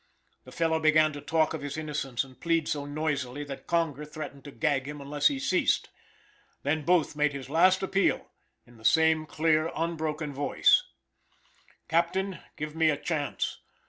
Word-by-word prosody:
The - - -12
fellow 160 -1 +1
began 155 0 +4
to 145 - -7
talk 160 0 +1
of 160 - -4
his 145 +1 -5
innocence 145 -5 -2
and 130 -1 -16
plead 165 -2 +1
so 145 -1 -2
noisily 145 -2 -2
that 140 -2 -8
Conger 160 -4 0
threatened 150 -2 -8
to 145 - -8
gag 140 -3 0
him 145 0 -6
unless 145 +1 +1
he 285 - 0
ceased. 190 -9 +1 0.7
Then 150 +2 0
Booth 170 -2 +2
made 150 -1 +1
his 135 -1 -7
last 185 +4 +4
appeal, 195 +1 +1 0.4
in 120 -1 -18
the 110 - -17
same 160 +3 +4
clear 155 +1 +1
unbroken 160 -2 -2
voice: 145 +1 +3 1.0
"Captain, 180 +2 0 0.2
give 155 +1 -5
me 160 -1 +3
a 145 - +1
chance. 145 -1 -2
155 Hz, 165 wpm, -28 LUFS, 145-165 Hz, 1.0 s, began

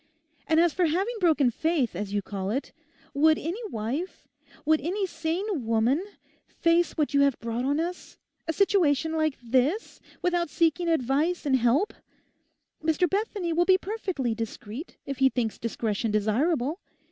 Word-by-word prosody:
And 320 0 +4
as 340 -2 +4
for 355 -2 +2
having 380 +9 0
broken 310 -8 +3
faith, 300 - 0
as 200 +2 -4
you 205 -1 -1
call 195 -1 -4
it, 265 +7 -2 0.4
would 310 +2 +4
any 340 +8 -4
wife, 255 - -4 0.4
would 315 +1 +3
any 380 +7 -1
sane 340 - -3
woman 230 +8 +2 0.4
face 335 +1 +2
what 300 -2 0
you 280 - +4
have 280 -2 +3
brought 235 +2 -3
on 285 +3 +1
us, 350 +2 -5 0.3
a - - +1
situation 325 -6 +2
like 310 -3 0
this, 265 - 0 0.2
without 350 -2 +1
seeking 335 +2 +1
advice 315 +4 +1
and 275 -2 +3
help? 260 - +2 0.9
Mr 320 +3 +2
Bethany 395 -3 -1
will 345 +2 +3
be 375 0 +6
perfectly 375 - -2
discreet—if 230 - -7
he 265 0 +5
thinks 235 -4 -2
discretion 225 -1 -2
desirable. 250 - +1
310 Hz, 150 wpm, -27 LUFS, 245-345 Hz, 0.9 s, be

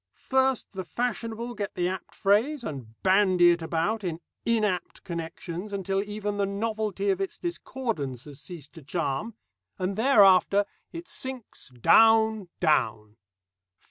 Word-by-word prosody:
First 265 -3 0
the 190 -1 -4
fashionable 235 +3 -3
get 205 -2 -5
the 175 0 0
apt 190 +1 -5
phrase, 240 +8 +2
and 125 - -7
bandy 185 -2 +5
it 170 0 0
about 170 +7 -1
in 170 -3 -3 0.3
inapt 215 -6 0
connections 170 +3 -6
until 195 0 -1
even 205 0 -4
the 200 -1 +1
novelty 205 -1 -1
of 190 0 -1
its 195 - -3
discordance 230 - -4
has 145 -1 -10
ceased 155 -5 -10
to 165 - -11
charm, 165 - -3 0.4
and 190 0 -2
thereafter 205 -4 +5 0.3
it 340 +1 -8
sinks 260 - -6
down, 220 - +5
down. 110 - +1
195 Hz, 135 wpm, -27 LUFS, 170-225 Hz, 0.4 s, bandy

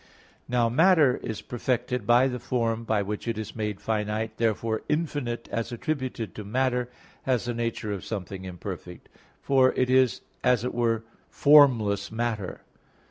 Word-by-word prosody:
Now 120 -1 +2
matter 155 +1 +4
is 110 - -6
perfected 125 -1 -2
by 120 +2 +5
the 125 -1 -3
form 115 -2 -1
by 110 -2 +1
which 105 +3 -5
it 115 -2 -1
is 110 -1 -6
made 105 -3 -3
finite; 110 0 -2
therefore 110 -1 0
infinite 145 -7 -2
as 115 +1 -2
attributed 120 - -3
to 105 - -7
matter, 125 +3 0 0.3
has 125 -3 0
the 120 - -2
nature 115 -2 -3
of 100 -3 -4
something 95 -3 -5
imperfect; 90 -1 -8 0.3
for 130 -2 +4
it 130 0 +1
is 130 -2 +3 0.2
as 125 -3 +3
it 125 - -2
were 115 -2 +1 0.3
formless 115 -9 +5
matter. 110 -4 -3
115 Hz, 150 wpm, -26 LUFS, 105-125 Hz, 0.3 s, by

